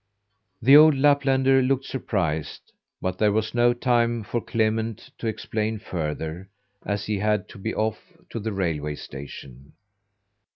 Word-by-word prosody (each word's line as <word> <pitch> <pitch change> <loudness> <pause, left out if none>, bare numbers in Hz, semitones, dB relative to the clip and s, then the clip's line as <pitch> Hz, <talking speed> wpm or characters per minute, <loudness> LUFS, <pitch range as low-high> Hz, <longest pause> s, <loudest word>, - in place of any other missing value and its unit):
The 135 +4 +8
old 155 0 +8
Laplander 135 -1 +3
looked 135 +1 0
surprised, 85 - -3 0.3
but 95 0 -2
there 105 -1 +4
was 110 +1 -1
no 120 0 +4
time 120 -2 +1
for 120 +3 -2
Clement 110 0 -1
to 115 - -3
explain 110 0 -2
further, 80 -1 -5 0.3
as 100 -1 -2
he 105 -2 -1
had 105 -1 0
to - - -12
be 110 +3 -3
off 110 -1 -3 0.2
to 115 - -4
the 110 +1 -3
railway 80 -6 -2
station. 70 -1 -10
110 Hz, 140 wpm, -24 LUFS, 95-120 Hz, 0.3 s, The